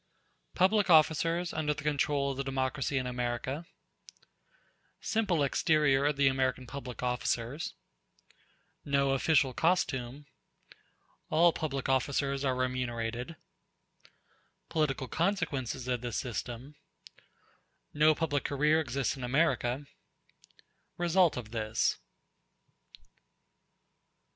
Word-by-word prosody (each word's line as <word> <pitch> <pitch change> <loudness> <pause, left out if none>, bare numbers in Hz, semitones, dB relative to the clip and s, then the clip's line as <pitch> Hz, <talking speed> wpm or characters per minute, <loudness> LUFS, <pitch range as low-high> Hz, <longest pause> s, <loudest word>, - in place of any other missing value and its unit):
Public 195 +2 +3
Officers 165 +2 +3
Under 150 -1 -1
The 150 - -8
Control 145 -1 +1
Of 135 - -6
The 135 - -1
Democracy 135 +1 -1
In 130 - -1
America 125 +5 -3 1.3
Simple 210 -9 0
exterior 145 -1 +2
of 150 - +1
the 140 -1 +4
American 130 -1 0
public 125 -1 -7
officers—No 125 - -4
official 135 -1 +2
costume—All 150 +2 -2
public 140 -4 -3
officers 135 +1 0
are 130 -2 +1
remunerated—Political 130 +3 -5
consequences 160 - -1
of 125 -2 -1
this 120 -3 -3
system—No 135 +5 -4
public 145 -3 -1
career 150 +3 +2
exists 135 -4 -1
in 130 - -8
America—Result 145 +5 -2
of 110 -3 -7
this. 110 -2 0
140 Hz, 85 wpm, -30 LUFS, 125-155 Hz, 1.3 s, the